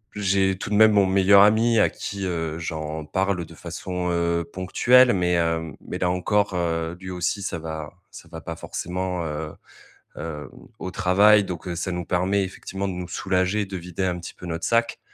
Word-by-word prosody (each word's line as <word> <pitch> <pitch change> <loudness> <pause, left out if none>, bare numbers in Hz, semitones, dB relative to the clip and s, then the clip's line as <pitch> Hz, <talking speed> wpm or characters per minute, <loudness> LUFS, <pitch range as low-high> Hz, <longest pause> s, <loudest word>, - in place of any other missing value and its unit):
j'ai 95 -1 +1
tout - - -6
de 105 - 0
même 110 0 +7
mon 100 -2 +4
meilleur 100 +1 +6
ami 110 +2 +4
à - - +4
qui, 100 -1 -5
heu, 80 -2 -3
j'en 80 -1 -4
parle 95 +1 -1
de 85 - -14
façon, 90 +2 -4
heu, 85 0 +1
ponctuelle, 120 +8 +4
mais, 90 -1 +1
hem, 80 -2 0
mais - - -6
là 90 - +1
encore, 100 +2 +1
heu, 85 -1 -1
lui 95 -1 -7
aussi, 90 +3 -2
ça 95 -3 -3
va 80 0 -6 0.2
ça - - -11
va - - -8
pas - - -6
forcément, 90 0 -3
heu, 75 0 -4 0.6
heu, 75 -2 -6
au - - -16
au 95 - -5
travail. 100 +2 +5
Donc 90 -1 -6
ça 90 +2 -3
nous 90 0 -3
permet 95 +2 +1
effectivement 95 +1 -5
de 95 - -3
nous 90 -1 -5
soulager, 95 +3 0
de 95 0 -7
vider 90 +2 -4
un 90 -1 -1
petit 85 - -9
peu 90 - -11
notre 85 0 -4
sac. 115 0 +1
90 Hz, 200 wpm, -24 LUFS, 85-100 Hz, 0.6 s, même